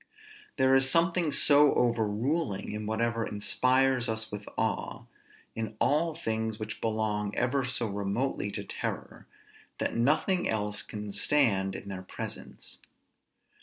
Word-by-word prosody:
There 130 -1 +4
is 135 0 +5
something 170 0 +2
so 145 +1 +5
overruling 115 - 0
in 105 0 -5
whatever 115 +1 0
inspires 130 +4 +2
us 110 0 -3
with 105 0 -7
awe, - - -2 0.5
in 110 -1 -4
all 155 +2 +2
things 110 -1 -2
which 110 0 -6
belong 105 -2 -1
ever 135 +2 +1
so 125 -1 -1
remotely 100 +2 -2
to - - -5
terror, - - -6 0.5
that - - -1
nothing 155 +9 +2
else 105 -1 0
can 105 -1 -7
stand 100 -7 +2
in - - -8
their 95 -1 -5
presence. 95 - -7
115 Hz, 130 wpm, -29 LUFS, 105-135 Hz, 0.5 s, is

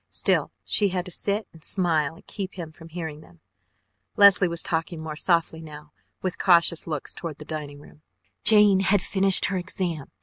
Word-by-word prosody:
Still - - 0
she 205 -2 +2
had 180 -1 -3
to 180 - -8
sit 200 +2 -2
and 160 -2 -13
smile 165 -6 0
and - - -19
keep 195 -2 -7
him 170 -4 -7
from 165 +1 -15
hearing 160 -3 -7
them. 85 - -20 0.8
Leslie 200 -2 +6
was 170 -1 -3
talking 165 0 -3
more 160 -1 -7
softly 165 0 0
now, 150 -1 -12 0.3
with 185 -2 -4
cautious 170 -3 +3
looks 155 -4 -5
toward 165 -4 -7
the 150 - -11
dining 150 -2 -7
room. 150 +1 -18 0.4
"Jane 210 -3 +6
had 195 0 +2
finished 195 -1 +4
her 195 - -1
exam. 175 -4 -4
170 Hz, 180 wpm, -24 LUFS, 155-190 Hz, 0.8 s, Leslie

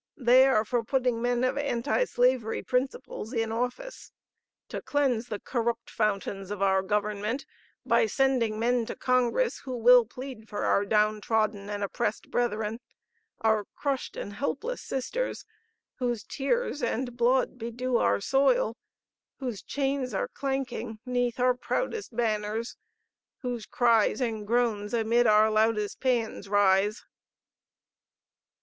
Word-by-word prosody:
They 255 +1 +6
are 225 -5 +3
for 240 +1 0
putting 250 -1 0
men 245 0 +1
of 255 +2 +1
Anti 280 - 0
Slavery 245 - +1
principles 255 -2 -2
in 225 -2 -1
office,... 250 - -4 0.6
to - - -5
cleanse 260 -5 0
the 210 -3 -4
corrupt 235 -2 -2
fountains 195 -2 -1
of 205 -1 -4
our 190 -1 +3
government 210 +5 -1 0.4
by 450 - +3
sending 260 - +1
men 235 0 +1
to - - -5
Congress 255 - +1
who 255 -2 -5
will 245 +1 +7
plead 250 -2 -9
for 205 - -3
our 200 - +2
down 210 0 +2
trodden 215 -2 0
and 205 0 -3
oppressed 210 +2 -2
brethren, 220 -2 -1 0.6
our 220 -2 +2
crushed 275 -3 -3
and 205 - -5
helpless 285 - -3
sisters, 480 - -3 0.5
whose 240 -4 -1
tears 295 - -1
and 245 +1 -2
blood 250 +2 +2
bedew 240 +2 -1
our 100 - +2
soil, 265 - +2 0.6
whose 245 -7 -4
chains 275 -2 -2
are - - -1
clanking 265 -5 -3
'neath 245 -1 -1
our 250 0 +4
proudest 415 - -3
banners, 220 0 -1 0.7
whose 245 -3 -4
cries 230 -3 +3
and 220 -5 -2
groans 225 -2 0
amid 235 +1 +3
our 215 +1 +5
loudest 215 -1 +1
paeans 235 -6 -1
rise." 205 +1 +3
235 Hz, 130 wpm, -28 LUFS, 215-255 Hz, 0.7 s, will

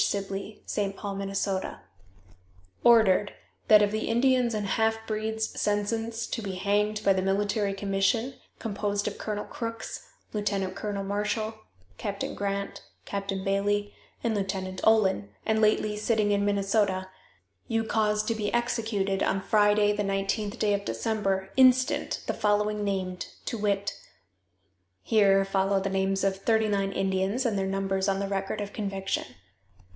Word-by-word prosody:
Sibley, 200 +1 -3
St. 200 -1 -2
Paul, 200 -1 -4
Minn._: 195 -1 -2 1.1
"Ordered, 215 -4 +5 0.3
that 210 -1 +8
of 205 - +1
the 215 +1 -2
Indians 245 0 +3
and 210 -1 -1
half 220 +2 +1
breeds 220 0 -2
sentenced 225 +2 -1
to 230 - -2
be 195 -3 -4
hanged 210 +2 0
by 195 - +6
the 190 - 0
military 200 +1 0
commission, 200 +6 0 0.2
composed 205 -2 -2
of 210 - -4
Colonel 210 -1 -3
Crooks, 230 - -6 0.3
Lieutenant 200 -3 -1
Colonel 205 -2 -3
Marshall, 210 +2 -1 0.5
Captain 200 -3 -3
Grant, 200 0 -3 0.2
Captain 195 -1 -3
Bailey 205 +1 0 0.3
and 230 - +1
Lieutenant 190 -2 -3
Olin, 195 - +3 0.2
and 220 0 +2
lately 215 0 +2
sitting 215 -1 +1
in 200 0 +2
Minnesota, 200 -1 +1 0.6
you 225 -2 0
cause 215 -1 +1
to 230 - 0
be 210 -2 -2
executed 220 -5 0
on 195 - +1
Friday, 205 +1 +3
the 210 - -1
nineteenth 195 +1 -1
day 210 -1 +2
of 200 0 -1
December, 195 - -1
instant, 255 -1 +4
the - - -1
following 210 0 +1
named, 185 -3 -2 0.2
to - - -2
wit: 200 -2 0 1.1
(Here 195 -3 +4
follow 195 0 +1
the 195 0 -2
names 195 0 0
of 195 -1 +1
thirty 220 +2 +2
nine 195 -1 0
Indians, 195 +7 0
and 225 -4 +1
their 195 -1 0
numbers 195 0 0
on 195 0 +1
the 200 - -1
record 195 +1 -2
of 205 0 -5
conviction.) 195 -2 -3
205 Hz, 145 wpm, -28 LUFS, 195-215 Hz, 1.1 s, that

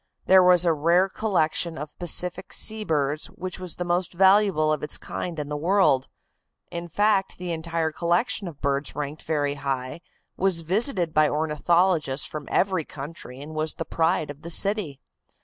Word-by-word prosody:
There 190 0 +6
was 180 -1 +6
a 170 - +3
rare 170 +5 +3
collection 170 -5 -1
of 150 +1 -8
Pacific 175 0 +1
Sea 220 0 -1
birds 150 -4 -1
which 185 +1 -7
was 180 -3 -4
the 175 - -4
most 175 +1 -1
valuable 190 -4 +4
of 155 - -3
its 150 - -1
kind 175 -2 -6
in 150 -1 -4
the 150 - -4
world. 160 -4 +2 0.6
In 170 0 -5
fact, 200 +2 +1
the 180 -1 -5
entire 165 0 -2
collection 175 +5 -1
of 155 -5 -10
birds 140 +1 -1
ranked 150 +1 -5
very 145 -2 -1
high, 135 +2 -3 0.3
was 185 -3 +1
visited 180 - +2
by 155 -1 +4
ornithologists 155 -1 +1
from 150 -2 -6
every 185 -4 +1
country, 140 -3 -9
and 155 +2 -9
was 155 0 0
the 165 - -5
pride 160 -2 0
of 145 +1 -14
the 170 - -8
city. 190 -6 +1
165 Hz, 170 wpm, -24 LUFS, 150-185 Hz, 0.6 s, There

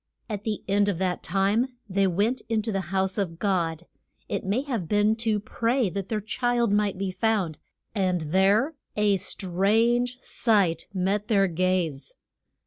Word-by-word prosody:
At 210 -2 -5
the 215 -2 -2
end 205 +1 +3
of 190 - -1
that 180 -1 -1
time 200 +8 +1
they 195 0 +2
went 205 +8 0
in 220 -2 +1
to 220 - -2
the 190 -4 -3
house 190 +1 0
of 170 -4 -2
God, 175 -4 -1 0.4
it - - -2
may 205 +8 0
have 235 - -3
been 210 +1 +3
to 225 -2 0
pray 230 +1 0
that 195 0 -4
their 220 - 0
child 240 +1 0
might 205 -2 +1
be 190 0 -2
found, 185 -5 0 0.3
and 185 -4 0
there 195 - +2 0.2
a 210 -2 +3
strange 225 +8 +1
sight 195 -8 +1
met 195 +2 -1
their 200 -4 +4
gaze. 175 -4 -1
200 Hz, 160 wpm, -26 LUFS, 185-220 Hz, 0.4 s, their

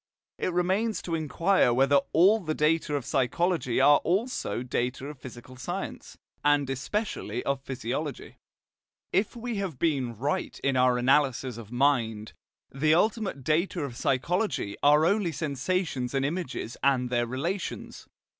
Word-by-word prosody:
It - - -1
remains 190 +6 0
to 170 - -4
inquire 165 0 +2
whether 135 +3 +4
all 195 +7 +5
the 155 -6 -3
data 150 0 +1
of 140 -4 -3
psychology 135 0 0
are 145 +2 +7
also 195 - -1
data 125 +1 -2
of 145 -2 -8
physical 130 0 -11
science, 130 - -6 0.3
and 145 -1 +3
especially 190 - -3
of 140 -1 -1
physiology. 135 +3 -5 0.7
If 200 +5 +1
we 235 -1 -4
have 190 -8 -3
been 130 -8 0
right 145 - -2
in 135 -1 +1
our 125 -1 +4
analysis 130 -1 +2
of 110 -1 -11
mind, 120 -5 +1 0.4
the 155 +3 +2
ultimate 210 - 0
data 165 +3 0
of 130 -4 -5
psychology 135 - -1
are 150 +2 +5
only 195 -1 +2
sensations 145 -2 -2
and 135 0 +1
images 145 -6 -4
and 125 -3 +2
their 120 -1 +1
relations. 165 +11 -4
145 Hz, 140 wpm, -27 LUFS, 130-175 Hz, 0.7 s, are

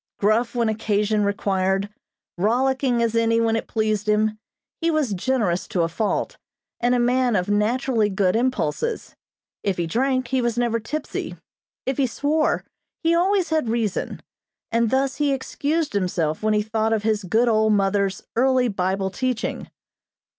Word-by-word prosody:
Gruff 220 +4 +1
when 235 -1 +1
occasion 215 -1 0
required, 195 -1 0 0.5
rollicking 245 +4 +1
as 230 0 0
any 230 0 +3
when 225 -1 +2
it 225 - -3
pleased 215 -1 -1
him, 215 0 +1 0.4
he 335 -1 +1
was 305 -9 +1
generous 200 -3 0
to 175 - 0
a - - +1
fault, 205 +6 -2 0.4
and 245 +1 +2
a - - +2
man 245 -1 +2
of 180 0 0
naturally 220 +2 +1
good 190 -1 +1
impulses. 260 - -1 0.5
If 195 -2 -1
he 170 - 0
drank, 255 +7 0
he 260 0 +1
was 240 -1 -1
never 235 -1 +1
tipsy; 300 +8 -5 0.5
if 265 0 -1
he 275 -2 +2
swore, 300 +5 0 0.4
he 330 +1 +3
always 370 +2 +2
had 310 -7 +1
reason; 225 -4 -2 0.5
and 230 0 +2
thus 270 +2 0
he 290 -1 +1
excused 290 +3 -2
himself 175 -5 -1
when 215 0 +2
he 210 - +2
thought 220 +1 0
of 215 -2 0
his 215 -1 0
good 220 +7 +2
old 220 -1 +3
mother's 195 -1 +1
early 255 0 +3
Bible 190 0 -1
teaching. 255 +1 -3
225 Hz, 160 wpm, -23 LUFS, 205-255 Hz, 0.5 s, any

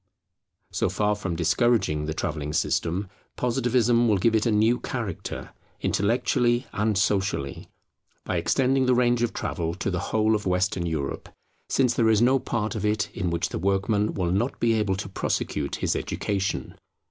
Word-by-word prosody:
So - - 0
far 105 0 +1
from 95 -5 -4
discouraging 85 -3 +1
the 80 - -3
travelling 75 -4 -3
system, 90 +6 0 0.3
Positivism 120 -1 +2
will 105 -3 +3
give 110 +5 +2
it 110 +1 +2
a - - +2
new 110 +3 +3
character, 115 -9 -5 0.3
intellectually 120 +3 +1
and 105 0 0
socially, 95 -9 -1 0.6
by 95 - -1
extending 130 +10 +2
the 125 - +4
range 120 -1 +2
of 120 -1 +1
travel 85 -1 -3
to 95 +2 -2
the 90 - -1
whole 110 0 +2
of 105 -2 -1
Western 90 -1 0
Europe, 75 -4 -3 0.4
since 130 -3 +2
there 115 -2 +2
is 110 -2 +4
no 130 +3 +4
part 115 -3 -2
of 110 - -4
it 105 0 0
in 90 -4 -1
which 85 0 -1
the - - -4
workman 100 +3 +1
will 90 -3 0
not 110 +8 -1
be 115 -1 +3
able 105 -3 +1
to 100 +1 -5
prosecute 75 -6 -2
his - - -1
education. 100 -2 -2
105 Hz, 170 wpm, -25 LUFS, 90-120 Hz, 0.6 s, the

